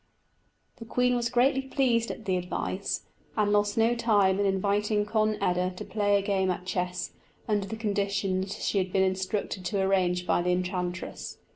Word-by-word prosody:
The 230 Hz, -, -9 dB
queen 250 Hz, +2 st, +2 dB
was 235 Hz, -1 st, 0 dB
greatly 260 Hz, +2 st, +3 dB
pleased 255 Hz, -4 st, +1 dB
at 225 Hz, -, -7 dB
the 190 Hz, -3 st, +1 dB
advice, 180 Hz, +2 st, -3 dB, 0.3 s
and 210 Hz, -1 st, +2 dB
lost 205 Hz, 0 st, +2 dB
no 225 Hz, +1 st, +4 dB
time 205 Hz, -5 st, +3 dB
in 200 Hz, -, +2 dB
inviting 205 Hz, +2 st, +1 dB
Conn 215 Hz, 0 st, +1 dB
eda 180 Hz, -1 st, 0 dB
to -, -, -7 dB
play 205 Hz, 0 st, +2 dB
a 200 Hz, -, -1 dB
game 195 Hz, -2 st, +1 dB
at 180 Hz, 0 st, -2 dB
chess, 180 Hz, -1 st, -2 dB, 0.4 s
under 205 Hz, -3 st, 0 dB
the 220 Hz, -, -4 dB
conditions 200 Hz, -3 st, -1 dB
she 200 Hz, -, +1 dB
had 185 Hz, -1 st, -2 dB
been 190 Hz, 0 st, +3 dB
instructed 190 Hz, +1 st, -2 dB
to 200 Hz, +2 st, -1 dB
arrange 185 Hz, -2 st, +1 dB
by 175 Hz, -, +2 dB
the 180 Hz, +1 st, +1 dB
enchantress. 180 Hz, 0 st, -3 dB
200 Hz, 175 wpm, -28 LUFS, 185-215 Hz, 0.4 s, no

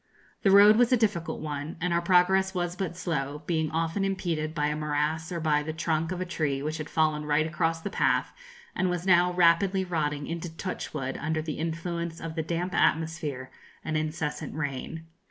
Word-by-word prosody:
The 195 Hz, -, +3 dB
road 205 Hz, +2 st, +8 dB
was 245 Hz, 0 st, +4 dB
a 250 Hz, -, +5 dB
difficult 205 Hz, -7 st, -1 dB
one, 150 Hz, +1 st, -5 dB
and 180 Hz, 0 st, 0 dB
our 170 Hz, -, +2 dB
progress 190 Hz, +2 st, +3 dB
was 175 Hz, -1 st, -1 dB
but 180 Hz, -3 st, -4 dB
slow, 150 Hz, -5 st, -3 dB
being 160 Hz, -3 st, 0 dB
often 165 Hz, +4 st, -1 dB
impeded 170 Hz, -5 st, -2 dB
by 150 Hz, -2 st, +1 dB
a 150 Hz, 0 st, 0 dB
morass 150 Hz, +2 st, -1 dB
or 170 Hz, -, -2 dB
by 150 Hz, -2 st, +2 dB
the 155 Hz, +1 st, -4 dB
trunk 160 Hz, 0 st, -1 dB
of 185 Hz, -, -3 dB
a 185 Hz, -, -2 dB
tree 150 Hz, -5 st, -1 dB
which 155 Hz, +2 st, -3 dB
had 155 Hz, -, -5 dB
fallen 155 Hz, -1 st, +1 dB
right 150 Hz, +1 st, +2 dB
across 165 Hz, +1 st, -1 dB
the 200 Hz, -, -4 dB
path, -, -, +1 dB, 0.4 s
and 185 Hz, -, +1 dB
was 180 Hz, 0 st, -2 dB
now 180 Hz, -1 st, +5 dB
rapidly 180 Hz, +2 st, +3 dB
rotting 150 Hz, -4 st, -1 dB
into 170 Hz, +1 st, -4 dB
touchwood 150 Hz, -7 st, -4 dB
under 155 Hz, +1 st, -1 dB
the 155 Hz, -2 st, -4 dB
influence 170 Hz, +1 st, -3 dB
of 165 Hz, -1 st, -5 dB
the 160 Hz, -, -1 dB
damp 170 Hz, +3 st, -2 dB
atmosphere 155 Hz, -6 st, 0 dB, 0.3 s
and 155 Hz, -, -2 dB
incessant 155 Hz, -1 st, -3 dB
rain. 150 Hz, +2 st, -4 dB
165 Hz, 190 wpm, -28 LUFS, 155-180 Hz, 0.4 s, road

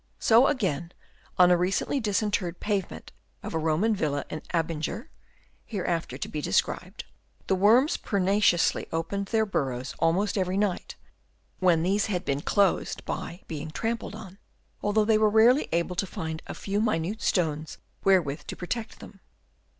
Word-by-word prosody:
So 235 Hz, +4 st, +5 dB
again 175 Hz, -, -1 dB, 0.4 s
on 180 Hz, 0 st, +6 dB
a -, -, +7 dB
recently 185 Hz, +10 st, 0 dB
disinterred 205 Hz, -5 st, -1 dB
pavement 200 Hz, -3 st, -3 dB, 0.3 s
of -, -, -6 dB
a 160 Hz, -, 0 dB
Roman 165 Hz, +8 st, +1 dB
villa 145 Hz, -6 st, -1 dB
at 155 Hz, -, -6 dB
Abinger 165 Hz, +6 st, -2 dB, 0.5 s
(hereafter 175 Hz, -6 st, -3 dB
to -, -, -4 dB
be 150 Hz, -, -4 dB
described) 95 Hz, -, -1 dB, 0.4 s
the -, -, +1 dB
worms 225 Hz, -, +4 dB
pertinaciously 195 Hz, -3 st, +2 dB
opened 180 Hz, +5 st, -2 dB
their 220 Hz, 0 st, +2 dB
bur 190 Hz, -8 st, 0 dB
rows 130 Hz, 0 st, -5 dB
almost 185 Hz, +6 st, +1 dB
every 185 Hz, 0 st, 0 dB
night, 200 Hz, -3 st, -1 dB, 0.6 s
when 175 Hz, -3 st, +3 dB
these 200 Hz, +3 st, +1 dB
had 180 Hz, -4 st, -2 dB
been 140 Hz, +1 st, -1 dB
closed 200 Hz, +1 st, +1 dB
by 175 Hz, -, -5 dB
being 155 Hz, 0 st, -5 dB
trampled 225 Hz, +5 st, -3 dB
on, 200 Hz, -3 st, -11 dB, 0.4 s
although 210 Hz, +1 st, +2 dB
they 215 Hz, 0 st, +3 dB
were 215 Hz, -1 st, +4 dB
rarely 230 Hz, +6 st, +4 dB
able 170 Hz, +2 st, 0 dB
to 195 Hz, -, 0 dB
find 160 Hz, -6 st, -5 dB
a -, -, -6 dB
few 200 Hz, +1 st, -2 dB
minute 210 Hz, -1 st, -1 dB
stones 155 Hz, -4 st, -1 dB, 0.3 s
wherewith 175 Hz, -8 st, +2 dB
to -, -, -5 dB
protect 220 Hz, +5 st, -5 dB
them. -, -, -12 dB
190 Hz, 155 wpm, -27 LUFS, 165-210 Hz, 0.6 s, a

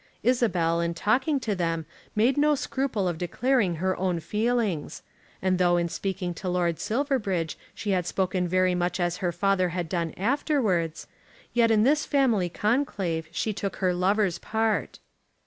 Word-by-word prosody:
Isabel 185 Hz, -9 st, +2 dB
in 170 Hz, 0 st, -1 dB
talking 260 Hz, -, +1 dB
to 220 Hz, -3 st, -1 dB
them 165 Hz, -3 st, -1 dB, 0.3 s
made 235 Hz, +5 st, +3 dB
no 295 Hz, +1 st, +3 dB
scruple 260 Hz, -8 st, -1 dB
of 170 Hz, -2 st, -2 dB
declaring 205 Hz, +1 st, +1 dB
her 185 Hz, +3 st, 0 dB
own 180 Hz, -2 st, 0 dB
feelings; 210 Hz, -2 st, -1 dB, 0.4 s
and 185 Hz, -1 st, +2 dB
though 175 Hz, -1 st, +4 dB
in 170 Hz, 0 st, 0 dB
speaking 185 Hz, -1 st, -3 dB
to 180 Hz, +2 st, -5 dB
Lord 175 Hz, -2 st, 0 dB
Silverbridge 215 Hz, -, -1 dB, 0.2 s
she 205 Hz, -, -3 dB
had 180 Hz, -2 st, 0 dB
spoken 185 Hz, -1 st, 0 dB
very 185 Hz, +1 st, +2 dB
much 175 Hz, 0 st, -1 dB
as 175 Hz, 0 st, 0 dB
her 180 Hz, -1 st, -1 dB
father 185 Hz, +1 st, +1 dB
had 175 Hz, -1 st, -3 dB
done 170 Hz, -1 st, -2 dB
afterwards, 205 Hz, -, 0 dB, 0.5 s
yet 235 Hz, -1 st, +4 dB
in 215 Hz, -1 st, +4 dB
this 295 Hz, +5 st, +2 dB
family 235 Hz, -, +2 dB
conclave 195 Hz, -, -1 dB
she 215 Hz, +6 st, -1 dB
took 200 Hz, 0 st, -4 dB
her 185 Hz, -2 st, +1 dB
lover's 190 Hz, +1 st, +1 dB
part. 220 Hz, -, -1 dB
190 Hz, 160 wpm, -26 LUFS, 175-225 Hz, 0.5 s, though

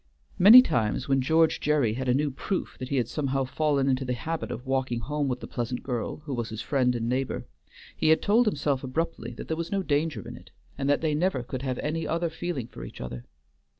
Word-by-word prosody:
Many 225 Hz, +7 st, +10 dB
times 120 Hz, -, 0 dB
when 135 Hz, -1 st, +2 dB
George 160 Hz, +4 st, +3 dB
Gerry 145 Hz, -7 st, +2 dB
had 130 Hz, +2 st, -3 dB
a -, -, +4 dB
new 145 Hz, +1 st, +1 dB
proof 185 Hz, +8 st, -3 dB
that 130 Hz, 0 st, -5 dB
he 140 Hz, -, -1 dB
had 125 Hz, -4 st, +1 dB
somehow 135 Hz, -1 st, -1 dB
fallen 140 Hz, +1 st, 0 dB
into 135 Hz, 0 st, +1 dB
the 125 Hz, -1 st, -2 dB
habit 160 Hz, +8 st, -4 dB
of 125 Hz, -, -6 dB
walking 130 Hz, -3 st, -1 dB
home 145 Hz, +4 st, -2 dB
with 125 Hz, -1 st, -2 dB
the -, -, -7 dB
pleasant 120 Hz, 0 st, -4 dB
girl 125 Hz, +2 st, -3 dB
who 145 Hz, -, -4 dB
was 120 Hz, -2 st, -3 dB
his 110 Hz, -1 st, -6 dB
friend 125 Hz, 0 st, +1 dB
and 115 Hz, -1 st, -2 dB
neighbor, 130 Hz, +2 st, -2 dB, 0.5 s
he -, -, +1 dB
had 160 Hz, -, +5 dB
told 225 Hz, +3 st, +3 dB
himself 140 Hz, -7 st, 0 dB
abruptly 130 Hz, -3 st, -3 dB
that -, -, -8 dB
there 160 Hz, -, -1 dB
was 170 Hz, 0 st, -4 dB
no 195 Hz, -1 st, 0 dB
danger 150 Hz, 0 st, -1 dB
in -, -, -7 dB
it, -, -, -14 dB, 0.3 s
and 140 Hz, 0 st, -2 dB
that 145 Hz, -, +3 dB
they 160 Hz, -2 st, +1 dB
never 150 Hz, -4 st, 0 dB
could 130 Hz, +1 st, -5 dB
have 130 Hz, -2 st, -2 dB
any 160 Hz, +2 st, -2 dB
other 170 Hz, 0 st, -1 dB
feeling 170 Hz, -7 st, -4 dB
for 65 Hz, -, -10 dB
each -, -, -10 dB
other. 60 Hz, -1 st, -6 dB
135 Hz, 235 wpm, -27 LUFS, 125-160 Hz, 0.5 s, Many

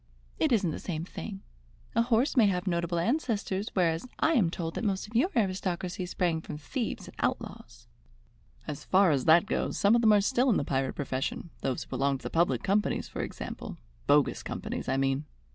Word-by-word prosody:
"It 315 Hz, -, +2 dB
isn't 195 Hz, -8 st, +2 dB
the -, -, -5 dB
same 165 Hz, -2 st, -4 dB
thing. 195 Hz, +1 st, -7 dB, 0.5 s
A 230 Hz, -, +3 dB
horse 240 Hz, +4 st, +2 dB
may 230 Hz, -5 st, +6 dB
have 180 Hz, -1 st, 0 dB
notable 170 Hz, -2 st, 0 dB
ancestors, 215 Hz, -, -1 dB
whereas 170 Hz, +2 st, +1 dB
I 325 Hz, -, +3 dB
am 210 Hz, -, +3 dB
told 165 Hz, -1 st, -4 dB
that -, -, -4 dB
most 195 Hz, -3 st, 0 dB
of 215 Hz, +2 st, -14 dB
your 280 Hz, +11 st, +4 dB
aristocracy 185 Hz, -3 st, -1 dB
sprang 175 Hz, -3 st, 0 dB
from 150 Hz, -, -7 dB
thieves 225 Hz, -, -4 dB
and -, -, -12 dB
outlaws." -, -, -3 dB, 0.8 s
"As 145 Hz, -, -5 dB
far 190 Hz, -2 st, +4 dB
as 135 Hz, -3 st, +1 dB
that 165 Hz, +4 st, +6 dB
goes, -, -, -1 dB
some 200 Hz, +2 st, +4 dB
of 235 Hz, -, +4 dB
them 220 Hz, -2 st, +6 dB
are 205 Hz, -, +5 dB
still 255 Hz, +4 st, +2 dB
in 220 Hz, -, +4 dB
the -, -, 0 dB
pirate 135 Hz, -1 st, -1 dB
profession, 145 Hz, +4 st, -3 dB
those 130 Hz, -2 st, -1 dB
who -, -, -21 dB
belong 140 Hz, 0 st, +1 dB
to -, -, -18 dB
the -, -, -5 dB
public 170 Hz, +2 st, +2 dB
companies, 205 Hz, +2 st, +1 dB
for -, -, -5 dB
example, -, -, -6 dB, 0.3 s
bogus 145 Hz, 0 st, +3 dB
companies, -, -, -5 dB
I 135 Hz, -, +1 dB
mean. 135 Hz, +2 st, 0 dB
185 Hz, 200 wpm, -29 LUFS, 160-220 Hz, 0.8 s, may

